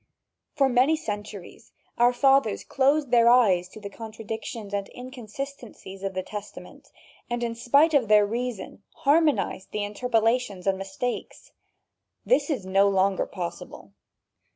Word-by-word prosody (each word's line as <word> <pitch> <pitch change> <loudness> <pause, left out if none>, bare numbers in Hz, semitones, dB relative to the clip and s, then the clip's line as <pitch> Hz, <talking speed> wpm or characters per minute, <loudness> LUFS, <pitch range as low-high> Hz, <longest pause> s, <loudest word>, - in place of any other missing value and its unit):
For 275 -3 +3
many 260 +5 +3
centuries 210 - -8 0.2
our 240 +1 +4
fathers 270 -3 +2
closed 280 0 +1
their 235 -1 +5
eyes 195 -8 +4
to 215 - -12
the 205 - -7
contradictions 220 -1 -7
and 200 -1 -3
inconsistencies 250 -4 -9
of 195 -1 -4
the 185 - -2
Testament 210 +1 -10 0.4
and 240 0 -2
in 230 -1 -2
spite 280 +7 +3
of 265 -6 +3
their 210 0 +5
reason 235 -2 -5 0.2
harmonized 285 - +2
the 210 - -3
interpolations 225 -2 0
and 190 -1 +1
mistakes. 195 +6 -5 0.7
This - - +2
is 260 -11 -2
no 195 +1 +3
longer 195 0 +1
possible. 175 -2 -7
225 Hz, 130 wpm, -25 LUFS, 200-255 Hz, 0.7 s, their